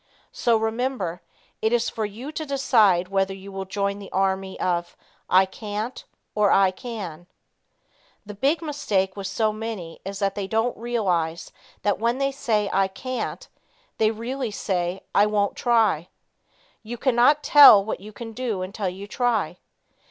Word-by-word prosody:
So 235 Hz, -2 st, +2 dB
remember, 220 Hz, -5 st, -2 dB, 0.4 s
it 220 Hz, -, +1 dB
is 240 Hz, -1 st, +2 dB
for 220 Hz, -, -2 dB
you 230 Hz, +8 st, -7 dB
to 315 Hz, -, -4 dB
decide 220 Hz, -, +3 dB
whether 195 Hz, 0 st, 0 dB
you 195 Hz, +1 st, -11 dB
will 195 Hz, 0 st, -5 dB
join 200 Hz, +1 st, -2 dB
the 200 Hz, -, -10 dB
army 190 Hz, 0 st, -1 dB
of 175 Hz, -1 st, -1 dB, 0.3 s
"I 185 Hz, +1 st, +6 dB
can't" 210 Hz, +4 st, -5 dB, 0.3 s
or 210 Hz, -1 st, +3 dB
"I 195 Hz, -1 st, +4 dB
can." 185 Hz, -6 st, -7 dB, 1.0 s
The 210 Hz, -, -8 dB
big 280 Hz, +11 st, 0 dB
mistake 210 Hz, -11 st, -1 dB
with 200 Hz, -1 st, -5 dB
so 215 Hz, +2 st, 0 dB
many 215 Hz, -7 st, -6 dB
is 195 Hz, +1 st, -5 dB
that 195 Hz, -1 st, 0 dB
they 200 Hz, -1 st, -4 dB
don't 225 Hz, +4 st, 0 dB
realize 185 Hz, -9 st, -1 dB, 0.3 s
that 205 Hz, -2 st, +1 dB
when 235 Hz, +3 st, +1 dB
they 275 Hz, 0 st, 0 dB
say 220 Hz, -6 st, 0 dB
"I 195 Hz, 0 st, +3 dB
can't," 255 Hz, +7 st, -5 dB, 0.5 s
they 220 Hz, -, +4 dB
really 235 Hz, +3 st, -3 dB
say, 185 Hz, -2 st, -2 dB
"I 205 Hz, +1 st, +5 dB
won't 205 Hz, -1 st, 0 dB
try." 220 Hz, -9 st, +2 dB, 0.7 s
You 235 Hz, +2 st, -7 dB
can 260 Hz, 0 st, +1 dB
not 290 Hz, +5 st, +4 dB
tell 275 Hz, -9 st, +9 dB
what 220 Hz, -, -3 dB
you 210 Hz, +3 st, -11 dB
can 225 Hz, +2 st, -8 dB
do 225 Hz, -5 st, -3 dB
until 195 Hz, +1 st, -3 dB
you 190 Hz, +2 st, -8 dB
try. 215 Hz, -6 st, -1 dB
210 Hz, 160 wpm, -24 LUFS, 190-235 Hz, 1.0 s, tell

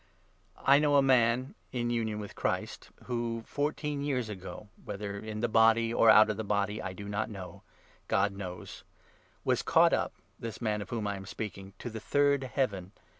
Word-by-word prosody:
I 140 Hz, +1 st, +5 dB
know 145 Hz, -1 st, +3 dB
a 140 Hz, -, +6 dB
man 125 Hz, -1 st, +3 dB, 0.2 s
in 120 Hz, -1 st, -1 dB
union 110 Hz, -3 st, -1 dB
with 105 Hz, -1 st, -7 dB
Christ, -, -, -3 dB
who, 120 Hz, -2 st, -3 dB
fourteen 145 Hz, 0 st, -2 dB
years 130 Hz, -6 st, -1 dB
ago 100 Hz, +1 st, -8 dB
— -, -, -37 dB
2 -, -, -22 dB
whether 100 Hz, 0 st, -5 dB
in 110 Hz, 0 st, -5 dB
the 120 Hz, -, +2 dB
body 115 Hz, +1 st, +4 dB
or 115 Hz, -, +5 dB
out 110 Hz, 0 st, +8 dB
of 105 Hz, -, -5 dB
the 110 Hz, -, -2 dB
body 105 Hz, +1 st, -1 dB
I 95 Hz, -, -4 dB
do 100 Hz, +2 st, -8 dB
not 105 Hz, +2 st, -2 dB
know; 95 Hz, -4 st, -9 dB, 0.5 s
God 100 Hz, +1 st, +2 dB
knows 90 Hz, -3 st, -8 dB, 0.3 s
— -, -, -34 dB
was -, -, +2 dB
caught -, -, +4 dB
up -, -, 0 dB, 0.3 s
(this 115 Hz, -1 st, -6 dB
man 105 Hz, -3 st, -1 dB
of 100 Hz, -, -8 dB
whom 115 Hz, -3 st, -2 dB
I 100 Hz, -1 st, -2 dB
am 95 Hz, 0 st, -9 dB
speaking) 95 Hz, -1 st, -6 dB
to 120 Hz, -, -6 dB
the 110 Hz, -, -5 dB
third 140 Hz, +3 st, +2 dB
Heaven. 105 Hz, -8 st, -2 dB
110 Hz, 200 wpm, -30 LUFS, 100-120 Hz, 0.5 s, out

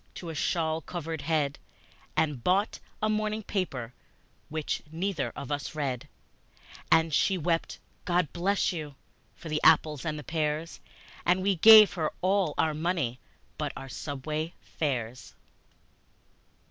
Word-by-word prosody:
to 170 Hz, -, -7 dB
a -, -, -4 dB
shawl 160 Hz, +1 st, 0 dB
covered 165 Hz, -3 st, -5 dB
head, 145 Hz, -2 st, 0 dB, 0.6 s
And 150 Hz, -6 st, +1 dB
bought 195 Hz, +4 st, +1 dB, 0.2 s
a -, -, +4 dB
morning 215 Hz, 0 st, -1 dB
paper, 135 Hz, -, -3 dB, 0.6 s
which 155 Hz, -1 st, -2 dB
neither 170 Hz, -2 st, -2 dB
of 140 Hz, -, -6 dB
us 145 Hz, +1 st, -3 dB
read; 135 Hz, -5 st, -2 dB, 0.8 s
And 160 Hz, -1 st, +4 dB
she 190 Hz, +6 st, +3 dB
wept, 165 Hz, 0 st, -1 dB, 0.3 s
"God 175 Hz, -4 st, 0 dB
bless 195 Hz, +3 st, +1 dB
you!" 150 Hz, -4 st, -6 dB, 0.4 s
for -, -, -10 dB
the 155 Hz, -1 st, -1 dB
apples 155 Hz, -3 st, +4 dB
and 150 Hz, -3 st, -4 dB
pears, 155 Hz, 0 st, -2 dB, 0.4 s
And 180 Hz, +2 st, +2 dB
we 195 Hz, 0 st, +2 dB
gave 215 Hz, +3 st, +9 dB
her 160 Hz, -4 st, -1 dB
all 190 Hz, -4 st, +2 dB
our 160 Hz, -1 st, +2 dB
money 155 Hz, -6 st, -1 dB, 0.4 s
but -, -, -2 dB
our 135 Hz, -, -8 dB
subway 155 Hz, +4 st, -4 dB
fares. 125 Hz, -5 st, -4 dB
160 Hz, 135 wpm, -28 LUFS, 150-180 Hz, 0.8 s, gave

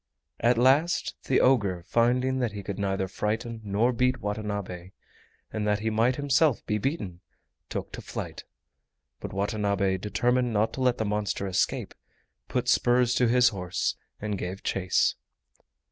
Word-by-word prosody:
At 120 Hz, +1 st, +3 dB
last 140 Hz, +8 st, +3 dB
the 130 Hz, -, +3 dB
ogre, 100 Hz, -9 st, +2 dB
finding 125 Hz, +4 st, +2 dB
that 120 Hz, -4 st, -1 dB
he 100 Hz, -1 st, -6 dB
could 100 Hz, 0 st, -5 dB
neither 95 Hz, -1 st, -1 dB
frighten 110 Hz, +4 st, -3 dB
nor 105 Hz, +5 st, +1 dB
beat 125 Hz, +2 st, +1 dB
Watanabe 100 Hz, -4 st, -4 dB, 0.6 s
and 105 Hz, -1 st, -1 dB
that 105 Hz, 0 st, +1 dB
he 110 Hz, 0 st, 0 dB
might 115 Hz, +4 st, +2 dB
himself 145 Hz, 0 st, +2 dB
be 105 Hz, 0 st, 0 dB
beaten, 100 Hz, -, -3 dB, 0.5 s
took -, -, -4 dB
to -, -, -7 dB
flight. -, -, -6 dB, 0.8 s
But -, -, -6 dB
Watanabe, 100 Hz, -1 st, 0 dB
determined 125 Hz, +4 st, +1 dB
not 105 Hz, +1 st, +1 dB
to 135 Hz, -, -5 dB
let 125 Hz, -1 st, +2 dB
the 110 Hz, -, -1 dB
monster 105 Hz, -1 st, -1 dB
escape, 95 Hz, -1 st, -1 dB, 0.5 s
put -, -, -1 dB
spurs 120 Hz, 0 st, +3 dB
to 125 Hz, 0 st, +3 dB
his 125 Hz, +1 st, +5 dB
horse 90 Hz, -4 st, -2 dB, 0.2 s
and 105 Hz, -2 st, -3 dB
gave 95 Hz, +2 st, -5 dB
chase. 95 Hz, -1 st, +1 dB
110 Hz, 150 wpm, -27 LUFS, 100-125 Hz, 0.8 s, his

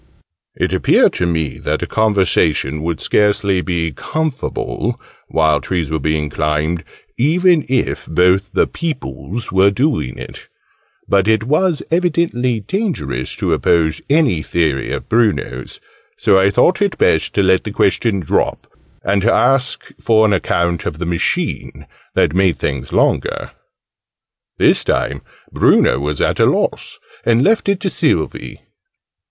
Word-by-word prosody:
It -, -, -1 dB
appeared -, -, +3 dB
to 85 Hz, -, -1 dB
me 80 Hz, -5 st, -2 dB
that -, -, -2 dB
a -, -, -1 dB
conversation 90 Hz, -9 st, +1 dB
would 80 Hz, -1 st, -3 dB
scarcely 100 Hz, -2 st, +1 dB
be 85 Hz, -3 st, -2 dB
'comfable' 130 Hz, -, -3 dB, 0.3 s
while 80 Hz, -2 st, +2 dB
trees 80 Hz, +1 st, -3 dB
were 80 Hz, -, -1 dB
being 75 Hz, +1 st, -1 dB
climbed, 75 Hz, +3 st, -1 dB, 0.4 s
even 170 Hz, +4 st, +3 dB
if 130 Hz, -1 st, -1 dB
both 90 Hz, +4 st, +2 dB
the -, -, +2 dB
'peoples' 120 Hz, -, -5 dB
were 95 Hz, +1 st, +4 dB
doing 125 Hz, -, -1 dB
it: -, -, -10 dB, 0.6 s
but 100 Hz, 0 st, +2 dB
it 110 Hz, -1 st, +2 dB
was 155 Hz, +6 st, +1 dB
evidently 160 Hz, -9 st, 0 dB
dangerous 170 Hz, -, -3 dB
to -, -, -1 dB
oppose 80 Hz, -2 st, +1 dB
any 140 Hz, -, +2 dB
theory 75 Hz, -6 st, -1 dB
of -, -, -5 dB
Bruno's; 105 Hz, -, -1 dB, 0.4 s
so 95 Hz, -, +3 dB
I 95 Hz, +1 st, +4 dB
thought 175 Hz, -, +2 dB
it 200 Hz, -2 st, 0 dB
best 80 Hz, -, +1 dB
to 100 Hz, -, +3 dB
let 95 Hz, -1 st, +3 dB
the 110 Hz, -, -5 dB
question 100 Hz, 0 st, +1 dB
drop, 80 Hz, -, -1 dB, 0.4 s
and 100 Hz, 0 st, +1 dB
to 115 Hz, -, +2 dB
ask 135 Hz, 0 st, +1 dB
for 110 Hz, -1 st, +3 dB
an 105 Hz, -, +2 dB
account 85 Hz, -2 st, -1 dB
of 75 Hz, -, -4 dB
the 90 Hz, -, -4 dB
machine 85 Hz, -1 st, -2 dB, 0.3 s
that -, -, +2 dB
made 95 Hz, -1 st, +2 dB
things 65 Hz, -2 st, -4 dB
longer. -, -, 0 dB, 1.1 s
This -, -, +3 dB
time -, -, -1 dB, 0.3 s
Bruno 65 Hz, -, +3 dB
was 75 Hz, 0 st, -3 dB
at -, -, 0 dB
a -, -, +5 dB
loss, -, -, -1 dB, 0.3 s
and 120 Hz, +2 st, +2 dB
left 215 Hz, -1 st, +2 dB
it 200 Hz, -2 st, +1 dB
to 190 Hz, -, -1 dB
Sylvie. -, -, -2 dB
95 Hz, 145 wpm, -17 LUFS, 80-125 Hz, 1.1 s, a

